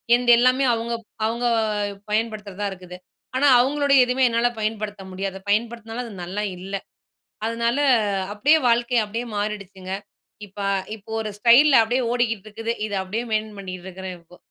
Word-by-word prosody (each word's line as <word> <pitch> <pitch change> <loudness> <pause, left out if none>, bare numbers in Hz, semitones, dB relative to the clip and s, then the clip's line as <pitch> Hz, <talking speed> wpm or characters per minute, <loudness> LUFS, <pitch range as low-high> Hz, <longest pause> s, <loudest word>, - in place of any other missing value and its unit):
என்து 245 0 +3
எல்லாமே 255 +2 +3
அவுங்க 230 +1 -2 0.3
அவுங்க 235 +2 -1 0.7
பயன்படுத்துறதா 210 -2 -2
இருக்குது. 180 -1 -10 0.4
ஆனா, 285 - +4
அவுங்களுடைய 275 +1 +3
எதுமே 255 +1 +2
என்னால 235 +1 +2
பயன்படுத்த 215 -2 -3
முடியாது. 190 +1 -4
பயன்படுத்துனாலும், 225 +2 -1
அது 230 - -9
நல்லா 195 +4 -3 0.2
இல்ல. 195 +2 -5 0.7
அதனால 235 +3 0 0.5
அப்பிடியே 285 +10 +4
வாழ்க்கை 235 +1 +2
அப்பிடியே 225 +4 -4
மாறிடுச்சுங்க. 200 -3 -4 0.5
இப்ப 195 +1 -19 0.4
இப்ப 210 0 -22
ஒரு 215 -1 -3
ஸ்டைல்ல 245 +4 +7
அப்பிடியே 245 +4 0
ஓடிக்கிட்டு 225 -4 0
இருக்குது. 225 +2 -3
இது 205 - -5
அப்பிடியே 215 +6 -3
மெயின்டென் 215 -1 -1
பண்ணிக்கிட்டு 185 -2 -7
இருக்கிறேன், 190 0 -7
இப்போ. 170 +1 -19
220 Hz, 140 wpm, -23 LUFS, 200-240 Hz, 0.7 s, ஸ்டைல்ல